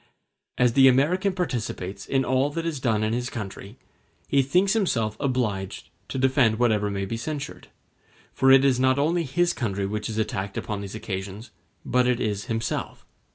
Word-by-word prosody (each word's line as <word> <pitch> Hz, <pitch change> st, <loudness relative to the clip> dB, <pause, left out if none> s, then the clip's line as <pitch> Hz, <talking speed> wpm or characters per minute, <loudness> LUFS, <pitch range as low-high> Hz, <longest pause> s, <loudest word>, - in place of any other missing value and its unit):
As 125 Hz, -2 st, +3 dB
the 135 Hz, 0 st, +7 dB
American 165 Hz, +10 st, +3 dB
participates 120 Hz, -, -4 dB
in 135 Hz, -1 st, +1 dB
all 130 Hz, +2 st, +2 dB
that 165 Hz, +1 st, -3 dB
is 160 Hz, -5 st, -2 dB
done 110 Hz, -4 st, +1 dB
in 110 Hz, +1 st, 0 dB
his 125 Hz, +1 st, -2 dB
country, 100 Hz, 0 st, -7 dB, 0.5 s
he 140 Hz, -, +3 dB
thinks 180 Hz, +9 st, +2 dB
himself 115 Hz, -, 0 dB
obliged 115 Hz, -8 st, -2 dB, 0.2 s
to -, -, -5 dB
defend 130 Hz, -4 st, +3 dB
whatever 110 Hz, -4 st, +2 dB
may 100 Hz, -1 st, -2 dB
be 115 Hz, +4 st, -4 dB
censured; 150 Hz, +4 st, -6 dB, 0.7 s
for 135 Hz, -, +3 dB
it 135 Hz, 0 st, +7 dB
is 130 Hz, -2 st, +3 dB
not 130 Hz, +1 st, +3 dB
only 165 Hz, +5 st, +2 dB
his 175 Hz, +6 st, +1 dB
country 100 Hz, -, -2 dB
which 105 Hz, +2 st, -3 dB
is 110 Hz, -, -4 dB
attacked 100 Hz, -3 st, -2 dB
upon 105 Hz, -2 st, -3 dB
these 100 Hz, +1 st, -7 dB
occasions, 100 Hz, +1 st, -6 dB, 0.3 s
but 125 Hz, 0 st, +2 dB
it 125 Hz, -1 st, +1 dB
is 105 Hz, -3 st, -2 dB
himself. 115 Hz, 0 st, -3 dB
125 Hz, 175 wpm, -25 LUFS, 105-135 Hz, 0.7 s, the